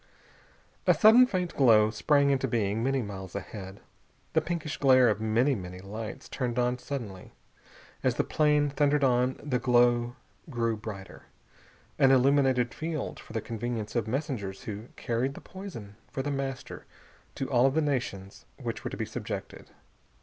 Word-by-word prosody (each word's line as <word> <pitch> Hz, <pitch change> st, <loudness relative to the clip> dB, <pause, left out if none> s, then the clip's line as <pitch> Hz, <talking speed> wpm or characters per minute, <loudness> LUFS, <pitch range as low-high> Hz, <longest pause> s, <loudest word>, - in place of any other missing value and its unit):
A -, -, +6 dB
sudden 235 Hz, +3 st, +7 dB
faint 180 Hz, -5 st, -2 dB
glow 110 Hz, -5 st, +5 dB
sprang 140 Hz, +5 st, +3 dB
into 135 Hz, -1 st, +1 dB
being, 110 Hz, -2 st, 0 dB
many 135 Hz, 0 st, +1 dB
miles 95 Hz, -3 st, -8 dB
ahead. 100 Hz, 0 st, -7 dB, 0.5 s
The 160 Hz, -, +3 dB
pinkish 160 Hz, -1 st, -3 dB
glare 130 Hz, -3 st, +5 dB
of 105 Hz, 0 st, -1 dB
many, 115 Hz, +6 st, +2 dB
many 90 Hz, -5 st, -6 dB
lights 105 Hz, +2 st, -7 dB
turned 125 Hz, -3 st, -3 dB
on 125 Hz, 0 st, +1 dB
suddenly. 115 Hz, -10 st, -6 dB, 0.7 s
As -, -, +1 dB
the -, -, +1 dB
plane 150 Hz, -1 st, +2 dB
thundered 145 Hz, 0 st, +2 dB
on 125 Hz, 0 st, +2 dB
the 130 Hz, -4 st, 0 dB
glow 120 Hz, -1 st, +3 dB, 0.3 s
grew 115 Hz, -4 st, 0 dB
brighter. 105 Hz, -3 st, -9 dB, 0.7 s
An 135 Hz, -, +6 dB
illuminated 130 Hz, -2 st, +3 dB
field, 160 Hz, -2 st, -4 dB
for -, -, -13 dB
the 110 Hz, -, -1 dB
convenience 115 Hz, -1 st, -4 dB
of 115 Hz, -2 st, 0 dB
messengers 120 Hz, -7 st, -3 dB
who 105 Hz, +2 st, -6 dB
carried 125 Hz, +4 st, -2 dB
the -, -, -8 dB
poison 120 Hz, -, -9 dB
for 135 Hz, -1 st, -4 dB
The 145 Hz, -, -2 dB
Master 135 Hz, -1 st, -5 dB, 0.5 s
to 135 Hz, -, -3 dB
all 125 Hz, +1 st, +5 dB
the 145 Hz, +4 st, 0 dB
nations 125 Hz, -10 st, -3 dB
which -, -, -5 dB
were -, -, -3 dB
to -, -, -7 dB
be -, -, -2 dB
subjected. -, -, -6 dB
125 Hz, 155 wpm, -28 LUFS, 110-140 Hz, 0.7 s, sudden